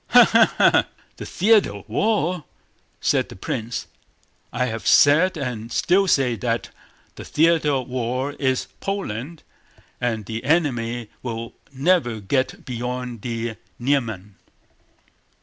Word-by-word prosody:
"Ha - - +8
ha - - +4
ha! - - +4 0.3
The - - -7
theater 205 - +3
of 100 - -11
war!" 180 - 0 0.6
said - - +1
the - - -10
prince. 115 +2 -4 0.7
"I 125 - 0
have 115 -2 -4
said 165 +6 +5
and 120 -5 -4
still 195 +2 +2
say 130 -8 +2
that 115 0 -2 0.5
the - - -7
theater 160 -1 +2
of 130 -2 -1
war 130 +2 -2
is 130 -2 0
Poland 165 - -4 0.6
and 115 -4 -1
the 110 +2 -5
enemy 120 -8 0
will 115 -1 -5 0.2
never 140 -5 +1
get 130 +6 -1
beyond 125 -1 -4
the 115 -1 -4 0.2
Niemen." 115 -7 -2
125 Hz, 125 wpm, -22 LUFS, 115-150 Hz, 0.7 s, Ha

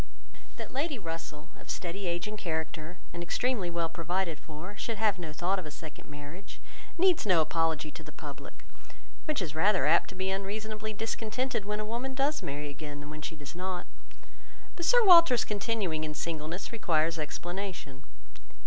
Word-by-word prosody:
That - - -6
Lady 285 +1 0
Russell, 165 -3 -6
of - - -14
steady 185 +2 -2
age 175 +2 0
and 215 - -4
character, 160 -2 -3 0.2
and 170 - -4
extremely 200 +2 +1
well 170 -1 +1
provided 170 0 -1
for, 165 +6 -8
should 225 +1 -2
have 210 -3 +3
no 165 -3 -4
thought 180 +5 +1
of 180 - -6
a - - -5
second 155 +1 -9
marriage, 150 +6 -9 0.4
needs 365 -1 +5
no 185 -5 +5
apology 160 -1 +2
to - - -9
the - - -10
public, - - -9 0.6
which 300 - +1
is 155 -4 -4
rather 185 +5 +4
apt 160 +3 +5
to 190 - -8
be 190 +1 0
unreasonably 215 +2 -2
discontented 225 +2 -1
when 210 +1 -1
a 215 - -1
woman 240 +4 -2
does 285 +3 +2
marry 145 +1 -3
again, 145 0 -6
than 145 +1 -7
when 155 0 -6
she 160 - -4
does 145 -2 -8
not; 180 0 -3 0.9
but 345 - -2
Sir 485 +3 +7
Walter's 335 - +9
continuing 200 -6 0
in 155 -1 -3
singleness 165 +3 -3
requires 165 -7 +2
explanation. 175 -3 -4
180 Hz, 175 wpm, -31 LUFS, 160-215 Hz, 0.9 s, Walter's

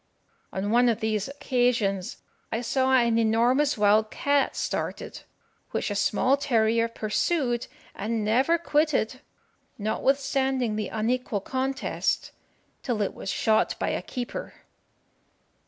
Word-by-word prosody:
On 195 +2 -2
one 240 +1 +5
of 230 -1 0
these 215 -2 -1
occasions 245 -8 0 0.3
I 225 - -1
saw 260 +2 +1
an 235 -3 +4
enormous 240 +6 +2
wild 210 +1 +4
cat 285 +3 +1
started, - - -3 0.5
which - - -2
a - - -2
small 215 +7 +2
terrier 230 -4 +2
pursued 240 +3 -1 0.3
and 220 +1 -2
never 260 +10 +3
quitted, 295 -7 +1 0.6
notwithstanding 265 +1 0
the 215 -2 -2
unequal 225 -1 -1
contest, 265 +4 -2 0.5
till 225 -4 -1
it - - -2
was - - -7
shot 220 +2 +2
by - - -1
a - - -1
keeper. 255 - -6
235 Hz, 120 wpm, -26 LUFS, 215-265 Hz, 0.6 s, one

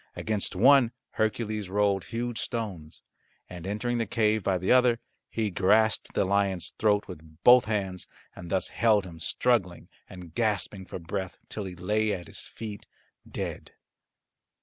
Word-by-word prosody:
Against 105 -3 -2
one 125 +4 +6 0.2
Hercules 110 -2 -1
rolled 100 -1 +1
huge 120 0 -3
stones, 100 -10 -5 0.4
and 90 0 -8
entering 120 +4 -1
the 115 - -1
cave 110 -2 +2
by 95 -1 +1
the 90 +1 0
other 125 -2 +5 0.3
he 110 -3 -1
grasped 105 +4 +2
the - - +2
lion's 95 -2 0
throat 105 -1 +2
with 80 -3 -11
both 125 -1 +8
hands, 95 -4 -2 0.3
and 85 -1 -9
thus 95 0 0
held 110 -4 +3
him 85 -3 -10
struggling 95 0 0 0.2
and 90 -3 -11
gasping 105 -2 -1
for - - -6
breath 95 +2 -5
till 105 - -5
he 90 -1 -7
lay 105 +4 0
at 90 -3 -5
his - - -8
feet 105 -2 -8 0.4
dead. - - -5
105 Hz, 150 wpm, -28 LUFS, 95-110 Hz, 0.4 s, both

